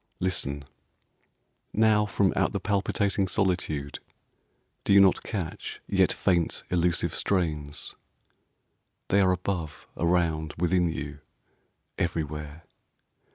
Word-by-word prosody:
Listen! 70 -6 -1 1.1
Now, 110 -1 +4
From 100 -2 +2
out - - +1
the - - -1
palpitating 100 -1 0
solitude 90 -7 -1 0.8
Do - - +3
you 100 - +8
not 95 -1 +5
catch, 95 -8 -5
yet - - +3
faint, 85 -3 0
elusive 90 -1 +1
strains? 75 -6 -1 1.2
They 100 - +4
are 95 -1 +4
above, 90 -3 -3
around, 85 -2 0
within 90 0 +2
you, 75 -2 -5 0.8
everywhere. 75 -2 -3
85 Hz, 100 wpm, -27 LUFS, 75-95 Hz, 1.2 s, you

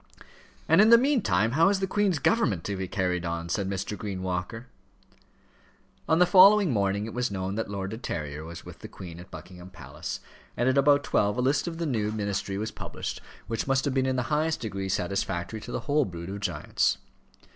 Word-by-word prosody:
"And 165 +5 +6
in 215 - +6
the 235 - +9
meantime 190 - +2
how 165 +8 +4
is 200 -1 +1
the 190 - 0
Queen's 195 -2 +1
government 130 - +1
to 100 - -3
be 95 -1 -4
carried 90 -3 -1
on?" 85 0 -3
said 95 +2 -1
Mr. 100 +1 -3
Green 95 -2 -5
Walker. 90 +6 -3 1.4
On 160 - +4
the 180 - +6
following 195 0 +7
morning 100 -1 0
it 115 - -7
was 125 0 -1
known 95 -1 -3
that 110 0 -3
Lord 100 -1 -4
De 110 - -6
Terrier 75 - -4
was 85 +1 -9
with - - -11
the - - -8
Queen 85 -3 -10
at 90 - -12
Buckingham 90 0 -11
Palace, 85 -2 -7 0.4
and 120 - +1
at 130 - +3
about 140 +1 +4
twelve 105 +3 +1
a - - +1
list 140 +5 +1
of 165 -1 -4
the 170 - -2
new 110 -7 -1
ministry 100 -2 -2
was 110 +2 -3
published, - - -6 0.2
which 115 +2 -3
must 135 +1 +2
have 140 - 0
been 130 0 +1
in 130 - 0
the 125 - 0
highest 155 +1 +1
degree 100 -4 -4
satisfactory 95 +2 -2
to - - -8
the - - -3
whole 150 -1 +1
brood 85 -1 -7
of 100 - -5
giants. 90 -7 0
105 Hz, 210 wpm, -27 LUFS, 95-145 Hz, 1.4 s, the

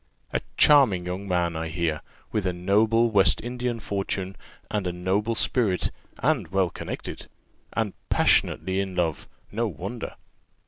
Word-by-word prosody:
A - - +1 0.2
charming 125 -12 +6
young 95 +3 -4
man, 85 -2 +1
I 80 0 -2
hear, 80 0 -1 0.3
with 105 -4 0
a 90 - 0
noble 110 +6 +3
West 100 -3 +4
Indian 120 -1 -3
fortune, 95 -2 -3 0.4
and 105 -3 -1
a - - 0
noble 95 +6 0
spirit, 110 -6 +1 0.3
and 135 - +2
well 95 0 +1
connected, - - -6 0.5
and 110 -3 -1 0.2
passionately 95 0 +3
in 95 -2 -2
love 85 -4 -1 0.2
no 115 +3 0
wonder. 100 +6 -6
95 Hz, 140 wpm, -26 LUFS, 90-115 Hz, 0.5 s, charming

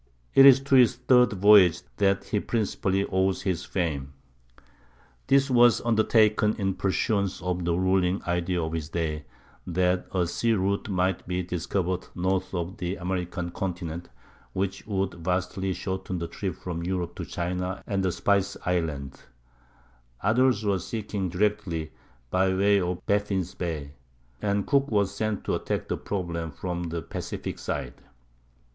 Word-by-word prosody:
It 135 - +9
is 135 -1 +9
to 135 0 -3
his 125 -4 +6
third 125 -2 +4
voyage, 100 -3 +6
then, 100 -1 +4
that - - -16
he 105 - +1
principally 100 -3 0
owes 95 0 0
his 90 -2 -1
fame. 70 -7 -2 1.1
This 135 0 +4
was 120 -1 +6
undertaken 110 -2 +3
in 95 -3 0
pursuance 100 +1 0
of 90 0 -2
the 85 -1 +1
ruling 95 +1 +2
idea 90 0 -1
of 80 0 -3
his 80 -2 -3
day, 75 -3 -2 0.4
that 90 +1 +1
a 90 -2 +1
sea 115 +7 0
route 100 +1 0
might 95 -1 0
be 90 0 -1
discovered 90 +1 -2
north 95 +1 0
of 90 +4 -3
the 90 -2 -3
American 90 -1 -3
continent, 85 -2 -4 0.4
which 95 +2 -3
would 95 -2 -1
vastly 95 +2 -1
shorten 95 0 -3
the 85 0 -3
trip 95 +3 -4
from 85 -2 -5
Europe 90 -1 -2
to - - -4
China 90 +2 -3
and 100 -1 -1
the 95 - +1
Spice 100 +2 +1
Islands. 80 -7 -2 1.0
Others 115 +1 +3
were 100 -2 +2
seeking 105 -1 -3
it 85 - -8
directly 95 -5 -1 0.4
by 95 +1 +2
way 100 +1 +3
of 90 0 -3
Baffin's 100 -3 0
Bay, 80 -5 -4 0.5
and 100 0 0
Cook 140 -1 +2
was 100 -3 +1
sent 105 -1 -2
to - - -1
attack - - -2
the - - -1
problem 85 -4 -3
from 85 +3 -4
the 85 0 -4
Pacific - - -5
side. - - -4
95 Hz, 150 wpm, -26 LUFS, 90-100 Hz, 1.1 s, It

